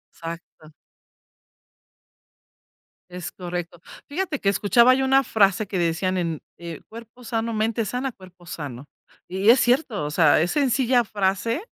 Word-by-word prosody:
Exacto. 165 -1 -9 2.4
Es 180 0 -7
correcto, 175 -2 -6 0.3
fíjate 320 -1 -3
que 195 - +1
escuchaba 235 +5 +4
yo 265 - 0
una 270 +1 +4
frase 200 -2 +2
que 190 - -3
decían: 175 +2 0
"En 165 -4 -2 0.2
en 170 -3 -8
cuerpo 230 +2 -12
sano, 230 0 -2
mente 220 +1 0
sana, 255 +4 -3
cuerpo 185 -3 -17
sano", 145 -4 -7 0.4
y 190 +4 +1
es 250 - +7
cierto, 245 - +1
o 150 - -4
sea, 155 -2 +4
es 175 - 0
sencilla 260 -3 +2
frase, 205 - -1
200 Hz, 140 wpm, -23 LUFS, 175-245 Hz, 2.4 s, es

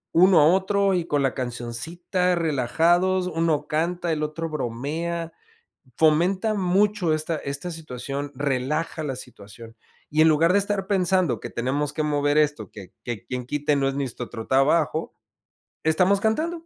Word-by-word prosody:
uno 180 -1 +6
a - - +6
otro 195 +2 +2
y 170 -2 -1
con 145 -4 0
la 135 - +1
cancioncita 155 +10 -2
relajados, 170 +5 +2
uno 160 -3 0
canta, 170 +2 -1
el 155 - -3
otro 160 +2 -3
bromea, 155 +6 -3 0.7
fomenta 180 +7 +3
mucho 195 -1 +1
esta 155 +1 -2
esta 145 +5 -4
situación, 145 -2 -5
relaja 145 +4 -2
la 135 -3 -3
situación, 115 +2 -11 0.3
y 155 +1 +1
en 160 - +6
lugar 165 +3 +4
de - - +5
estar 200 -1 -2
pensando 185 - +1
que - - -7
tenemos 140 +5 -2
que 155 - -1
mover 145 -1 +1
esto, 150 -1 0
que 100 -4 -12
que 120 -5 -5
quien 125 -1 -5
quite 145 +2 0
no 135 -1 +1
es 135 - -3
ni 140 0 -1
nuestro 120 -1 -6 0.2
trabajo, 150 +4 +2 0.7
estamos 185 +5 +3
cantando. 325 +10 -1
155 Hz, 155 wpm, -24 LUFS, 140-180 Hz, 0.7 s, uno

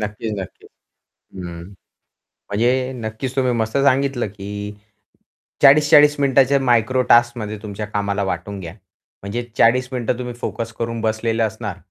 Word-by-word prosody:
नक्कीच, 105 +1 -4
नक्कीच. 95 -2 -9 0.7
हं. 85 -2 -7 0.9
म्हणजे 125 +5 +1
नक्कीच 120 +3 -5
तुम्ही 130 -2 +1
मस्त 110 +1 -1
सांगितलं 135 -3 +2
की 105 +1 -7 0.9
40-40 150 +1 +6
मिनिटांच्या 140 0 +3
मायक्रो 125 0 +2
टास्कमध्ये 120 -3 +3
तुमच्या 105 0 -5
कामाला 100 -1 -2
वाटून 95 +2 -4
घ्या. 85 -2 -8 0.5
म्हणजे 115 +5 -3
40 125 +2 +4
मिनिटं 120 -1 -1
तुम्ही 125 -1 -5
फोकस 115 0 -4
करून 115 -1 -3
बसलेले 110 +1 0
असणार. 110 -3 -4
115 Hz, 125 wpm, -20 LUFS, 105-130 Hz, 0.9 s, 40-40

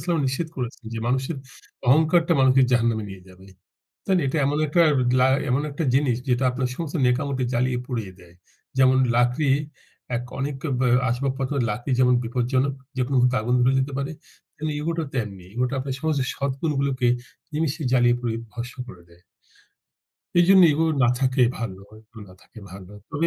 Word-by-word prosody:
ওয়াসাল্লাম 170 -3 0
নিষেধ 160 +5 -3
করেছেন 125 0 -5
যে, - - -3
মানুষের 130 +5 -1 0.5
অহংকারটা 160 +5 +4
মানুষকে 130 0 +5
জাহান্নামে 115 -3 +1
নিয়ে 95 -1 -10
যাবে। 95 +1 -16 0.6
তাই 195 - +1
না? - - +1
এটা 135 - -1
এমন 145 +2 0
একটার 165 +3 +4 0.3
লা 130 - +5 0.2
এমন 130 +3 +2
একটা 145 +4 -3
জিনিস 135 -3 +2
যেটা 125 +1 +1
আপনার 125 0 -1
সমস্ত 165 -1 -5
নেক 125 0 +4
আমলকে 135 -2 -2
জ্বালিয়ে 125 +1 0
পুড়িয়ে 115 -7 -4
দেয়। 85 -1 -18 0.4
যেমন 130 0 +5 0.2
লাকড়ি 125 +4 +2 0.7
এক, 120 - -5 0.2
অনেক 140 +1 -2 0.2
ব্যা 125 -1 +2 0.2
আসবাবপত্রের 135 +2 -1
লাকড়ি 115 +6 -3
যেমন 125 -1 +4
বিপদজনক, 130 +3 0 0.2
যেকোনো 130 +2 -1
মূহুর্তে 125 +1 +3
আগুন 120 +3 0
ধরে 125 +2 +3
যেতে 130 +2 -2
পারে, 140 +3 -3 0.4
তেমনি 155 0 -3
ego 165 - -1
টাও 160 -3 -2
তেমনি। 105 -7 -4
ego 125 +1 +1
টা - - -6
আপনার 130 0 -4
সমস্ত 155 -2 0
সৎ 140 0 -2
গুন 160 - 0
গুলোকে 135 -3 0 0.5
নিমেষে 155 +1 -1
জ্বালিয়ে 120 -2 +4
পুড়িয়ে 115 -2 -3
ভস্ম 125 +3 -7
করে 90 -7 -12
দেয়। 85 +1 -21 1.2
এইজন্য 185 +2 +6
ego 160 +3 +1 0.2
না 120 - +5
থাকাই 130 -2 +3
ভালো 100 -5 -5 0.2
ego 110 +1 -17
না - - -14
থাকাই 110 - -15
ভালো, 95 0 -11 0.2
তবে, 160 +4 0
130 Hz, 180 wpm, -23 LUFS, 120-140 Hz, 1.2 s, এইজন্য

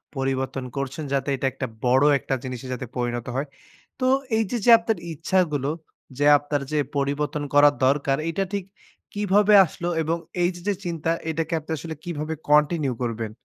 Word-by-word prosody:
পরিবর্তন 135 0 -2
করছেন। 140 +3 -4
যাতে 140 +1 0
এটা 135 - -3
একটা 130 -1 -4 0.2
বড় 130 +3 +4 0.2
একটা - - -3
জিনিসে 130 0 -6
যাতে 125 0 -5
পরিনত 120 -1 -2
হয়। 140 +2 -1 0.5
তো 255 - 0 0.3
এই 225 - +3
যে, 240 - 0
যে 240 - +7
আপনার 225 -3 -1 0.2
ইচ্ছাগুলো 155 -3 0 0.5
যে 145 - +1
আপনার 145 0 -2
যে 155 - 0 0.2
পরিবর্তন 145 +1 -1
করার 145 0 +6
দরকার 140 0 +2
এটা 195 +4 -1
ঠিক 200 -2 -1 0.5
কিভাবে 205 +1 +3
আসলো? 170 +2 -6
এবং 165 +2 0 0.2
এই 175 - +3
যে, 175 - -10
যে 205 - +3
চিন্তা 165 -1 -2 0.2
এটাকে 160 +1 -2
আপনি 155 - -10
আসলে 160 +1 -6
কিভাবে 160 -2 -3 0.2
কন্টিনিউ 150 -2 +3
করবেন? 115 -2 -3
145 Hz, 170 wpm, -24 LUFS, 135-170 Hz, 0.5 s, যে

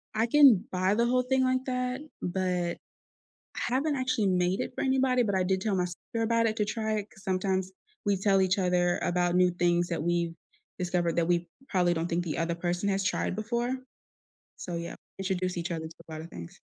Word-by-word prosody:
I 225 +2 +2
can 265 -7 +7
buy 185 +2 +2
the 235 - +3
whole 250 +1 +2
thing 260 +1 +2
like 255 0 +1
that, 250 +1 -2 0.2
but 180 -1 -1 0.8
I 245 - -1
haven't 290 +2 +1
actually 255 -5 0
made 180 +1 +1
it - - -3
for - - -2
anybody, 260 -1 +3
but 200 -2 0
I 185 - +2
did 190 +1 +1
tell 205 0 0
my 180 -1 +1
sister 180 +6 -5
about 230 0 +2
it 220 -1 0
to 210 - +1
try 220 +1 -2
it 205 0 -6
'cause 195 - -17
sometimes 190 0 0 0.3
we 200 -1 +2
tell 195 0 +3
each 190 +2 +2
other 180 -1 +2
about 175 0 +1
new 180 0 +5
things 175 0 +1
that 170 -3 -2
we've 170 0 0 0.4
discovered 175 -2 0
that 170 -1 +2
we 175 0 +1 0.2
probably 180 -3 +2
don't 165 0 -1
think 175 +1 0
the 160 - -3
other 165 +1 0
person 175 +3 -1
has 195 0 +1
tried 185 - 0
before. 235 +4 -1 0.8
So, 175 -2 -5
yeah, 170 0 -5 0.2
introduce 185 -1 -1
each 175 +1 -3
other 160 -1 -3
to 160 - -11
a - - -8
lotta 155 +1 -6
things. 85 - -10
185 Hz, 210 wpm, -29 LUFS, 175-225 Hz, 0.8 s, can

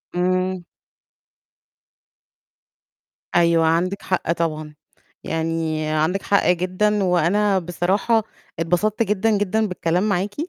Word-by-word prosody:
إمم. 185 0 0 2.7
أيوه، 170 -1 +4
عندِك 175 +5 0
حق 185 -2 -1
طبعًا، 155 -3 -3 0.5
يعني 160 -1 -2
عندِك 155 +5 0
حق 200 - +2
جدًا، 185 +4 +1
وأنا 190 +3 +2
بصراحة 190 +6 0 0.4
اتبسطت 180 +7 +1
جدًا، 210 +1 +1
جدًا 210 +2 0
بالكلام 180 +2 -1
معاكِ، 200 +1 -1
180 Hz, 90 wpm, -21 LUFS, 165-200 Hz, 2.7 s, أيوه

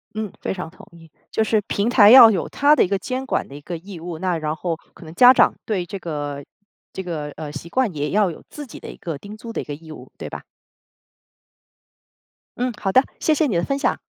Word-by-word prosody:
嗯， 215 -2 -3
非 - - -2
常 180 -3 -6
同 185 - -16
意。 165 -1 -16 0.2
就 220 - +1
是 215 -1 +1
平 205 +3 0
台 215 -4 +7
要 240 -3 +11
有 190 -6 -1
它 290 +1 +4
的 - - +4
一 - - 0
个 200 0 0
监 255 +7 -4
管 265 - -1
的 140 - -11
一 145 - -10
个 175 +3 -6
义 185 +2 -10
务， 165 -1 -7
那 180 -2 0
然 155 -1 -2
后， 170 +1 -2 0.2
可 170 - -14
能 155 - -10
家 250 +4 +8
长 - - +4
对 190 -5 -1
这 195 - -6
个 145 -4 -5 0.5
这 - - -5
个， 160 -5 -5
呃， 155 -2 -6
习 155 +3 -8
惯 250 -6 0
也 145 0 -2
要 205 -2 +2
有 165 - -10
自 295 - -8
己 - - -11
的 - - -9
一 - - -14
个 165 -4 -5
叮 205 +6 -11
嘱 230 +1 -9
的 - - -2
一 - - -7
个 145 - -6
义 160 +2 -12
务， - - -12
对 - - -6
吧？ - - -8 2.1
嗯， 250 -1 -1
好 195 - 0
的， 260 +6 +5 0.2
谢 315 - +2
谢 305 0 +2
你 205 - -1
的 170 - +1
分 275 +6 -1
享。 - - 0
185 Hz, 265 characters per minute, -21 LUFS, 160-225 Hz, 2.1 s, 要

